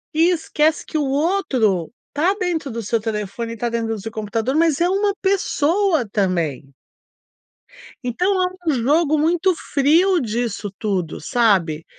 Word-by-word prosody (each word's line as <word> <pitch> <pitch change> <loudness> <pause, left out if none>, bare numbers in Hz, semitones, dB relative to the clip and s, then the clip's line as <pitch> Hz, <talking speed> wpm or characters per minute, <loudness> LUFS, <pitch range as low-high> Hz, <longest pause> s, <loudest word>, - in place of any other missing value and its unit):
E 330 +3 +4
esquece 315 -2 0
que 315 - -3
o 295 - +1
outro 265 - +1 0.2
tá 335 +7 +2
dentro 330 - -2
do 230 0 -4
seu 225 +2 -1
telefone, 225 +1 -4
tá 240 - -2
dentro 230 -1 -2
do - - -7
seu 225 +2 -7
computador, 225 +5 -2
mas 325 -2 +2
é 345 - +3
uma 400 +2 +1
pessoa 370 - +1
também. 170 -9 -1 1.3
Então 250 +9 -1 0.4
é - - +4
um - - +1
jogo 295 +5 +2
muito 340 +4 +2
frio 330 +7 +2
disso 225 -4 -3
tudo, 190 -7 -2
sabe? 175 -7 +1
255 Hz, 145 wpm, -20 LUFS, 215-330 Hz, 1.3 s, E